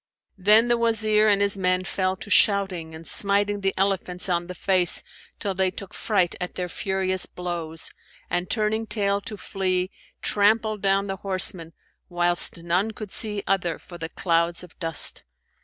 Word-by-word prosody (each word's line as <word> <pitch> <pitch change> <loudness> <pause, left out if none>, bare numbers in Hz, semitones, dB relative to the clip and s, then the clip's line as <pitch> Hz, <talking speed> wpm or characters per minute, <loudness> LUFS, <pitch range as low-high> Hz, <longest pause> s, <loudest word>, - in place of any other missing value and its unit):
Then 210 +5 +5
the 240 -1 +2
Wazir 215 -2 +3
and 200 -1 +4
his 200 -1 +1
men 185 0 +1
fell 185 -1 -1
to 205 - -10
shouting 190 -6 +2
and 160 +1 -11
smiting 200 +2 +2
the 195 0 0
elephants 190 -1 0
on 175 -1 0
the 180 - -7
face 180 -1 +1 0.3
till 200 - -3
they 190 0 +1
took 190 +1 -9
fright 190 -6 0
at 180 - -4
their 180 -1 -3
furious 190 0 +1
blows, 170 -3 -3 0.4
and 175 +1 -2
turning 220 0 0
tail 200 -2 0
to 210 +1 -7
flee, 185 -1 -1 0.3
trampled 215 0 +2
down 195 0 +2
the 195 -1 -4
horsemen, 185 -3 +1 0.4
whilst 175 -1 +1
none 180 +5 +1
could 215 -2 -8
see 210 -2 0
other 180 -4 0
for 175 -1 -13
the 165 0 -5
clouds 170 0 0
of 180 - -14
dust. 165 -3 +1
190 Hz, 165 wpm, -24 LUFS, 180-205 Hz, 0.4 s, Then